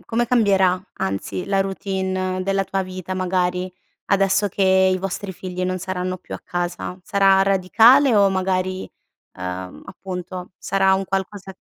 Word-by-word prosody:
come 240 +1 0
cambierà 195 -6 +3
anzi 95 - -3
la 195 -1 +1
routine 190 -1 -2
della 195 0 0
tua 195 0 -2
vita 185 0 -6
magari, 180 0 -1 0.3
adesso 195 +1 +2
che 190 0 +3
i 185 - 0
vostri 195 +1 -4
figli 180 0 -6
non 185 0 -1
saranno 185 0 -3
più - - -9
a - - -7
casa? 175 +1 -4
Sarà 195 -2 +4
radicale 225 +7 +5
o 200 -1 +5
magari, 185 0 -1 0.5
ehm, 90 0 -6
appunto 185 -1 -7
sarà 195 0 +2
un 195 0 -1
qualcosa 195 0 -4
190 Hz, 145 wpm, -21 LUFS, 185-195 Hz, 0.5 s, radicale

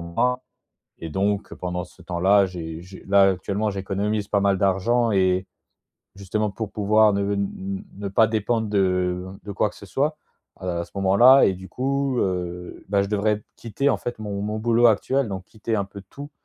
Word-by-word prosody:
mois. 125 +10 -1 0.6
Et 80 - -6
donc 100 +4 -1
pendant 90 0 -4
ce 90 +1 -16
temps-là, 95 +3 +3
j'é 85 -3 -6
j'é 95 +2 -12
là, 100 0 +6
actuellement, 100 +3 -2
j'économise 100 +2 -2
pas 100 - +2
mal 100 -1 +2
d'argent 105 +5 +2
et 95 -1 +2 0.7
justement 100 +2 -2
pour 105 +1 -5
pouvoir 105 0 +4
ne 100 - 0
n 100 +1 -1
n 100 -1 -3
ne 100 0 -4
pas 110 +3 +4
dépendre 110 +1 -1
de, 105 -1 +1
heu, 90 -1 0 0.2
de 100 - -6
quoi 100 +1 0
que - - -18
ce 100 - -12
soit 145 +8 -1 0.4
à 95 - -9
la 85 -1 -1
à 85 - -3
ce - - -19
moment-là. 100 +8 +6
Et 95 - +1
du 95 +1 -10
coup, 135 0 -1
heu, 90 -2 -3
ben 100 0 +2
je 100 - -3
devrais 105 0 +1
p 105 - -21
quitter 120 +5 -1
en - - +1
fait 120 - -6
mon 100 -2 -4
mon 105 +1 -3
boulot 120 +2 +3
actuel, 125 +4 +1
donc 95 -2 -5
quitter 110 +1 -3
un 100 - 0
peu 100 0 -11
tout. 145 +1 -9
100 Hz, 205 wpm, -23 LUFS, 95-110 Hz, 0.7 s, là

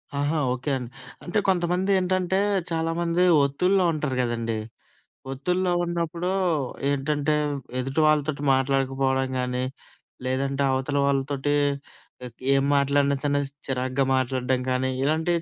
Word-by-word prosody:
ఆహా! 145 +3 0
ఓకే 130 +3 -3
అండి. 125 -2 -7 0.3
అంటే, 175 - -2
కొంతమంది 180 +1 +1
ఏంటంటే, 185 0 0 0.3
చాలామంది 165 +1 0 0.2
ఒత్తిడిలో 180 +7 +2
ఉంటారు 150 -4 -2
గదండీ! 115 -2 -2 0.8
ఒత్తిడిలో 180 +7 0
ఉన్నప్పుడూ 170 +1 -2 0.6
ఏంటంటే, 145 +2 0 0.2
వ్ 140 - -5 0.2
ఎదుటి 135 +4 0
వాళ్ళతోటి 150 -1 +1
మాట్లాడకపోడం 135 0 +1
గానీ, 125 0 -1 0.6
లేదంటే 135 +2 0
అవతల 130 +2 -1
వాళ్ళతోటి 140 +1 0 0.7
ఎక్ 120 -1 -12
ఏం 135 - +3
మాట్లాడినా 140 0 +2
చిన్న 145 -1 +1 0.3
చిరాగ్గా 130 +1 0
మాట్లాడడం 130 0 0
కానీ, 130 +1 0
ఇలాంటియి 160 +4 +1
140 Hz, 115 wpm, -25 LUFS, 130-165 Hz, 0.8 s, ఏం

